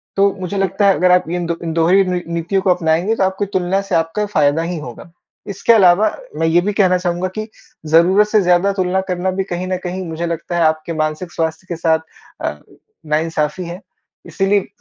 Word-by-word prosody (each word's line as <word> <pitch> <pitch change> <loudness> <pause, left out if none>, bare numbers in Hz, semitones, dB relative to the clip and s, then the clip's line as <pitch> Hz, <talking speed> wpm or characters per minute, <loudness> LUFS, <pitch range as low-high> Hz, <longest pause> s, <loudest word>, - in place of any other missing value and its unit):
तो 200 0 +3
मुझे 185 +2 -4
लगता 195 +1 +1
है 195 - +5
अगर 180 0 +3
आप 180 -2 +3
इन 175 0 -2
2 170 0 -2
इन 165 -1 -3
दोनों 165 +2 +2
ही 195 - +5
नी 180 -1 -1
नीतियों 170 +4 -1
को 190 - 0
अपनाएँगे 170 +5 0
तो 195 - 0
आपकी 190 +2 0
तुलना 190 +1 0
से 195 -1 -3
आपका 165 +6 0
फ़ायदा 155 -5 +1
ही 170 +1 -3
होगा। 150 +4 -10 0.4
इसके 200 +4 +2
अलावा, 195 0 +5 0.3
मैं 165 - 0
ये 170 +2 +3
भी 205 +2 -2
कहना 185 -3 +3
चाहूँगा 180 0 -2
कि 215 +1 -4 0.4
ज़रूरत 175 +6 +4
से 210 0 +3
ज़्यादा 180 +2 +3
तुलना 185 0 0
करना 180 +1 -1
भी 190 +1 -2
कहीं 180 -1 -4
न 185 0 -1
कहीं 185 +1 -4
मुझे 165 +1 -4
लगता 170 +1 -4
है 170 - +1
आपके 155 +1 0
मानसिक 155 +3 -3
स्वास्थ्य 160 +2 -3
के 170 - -2
साथ 160 -1 +1 0.4
अ, 75 0 -3 0.5
नाइंसाफी 155 +2 -1
है। 170 +2 -7 0.5
इसीलिए 195 0 0
180 Hz, 210 wpm, -18 LUFS, 165-195 Hz, 0.5 s, है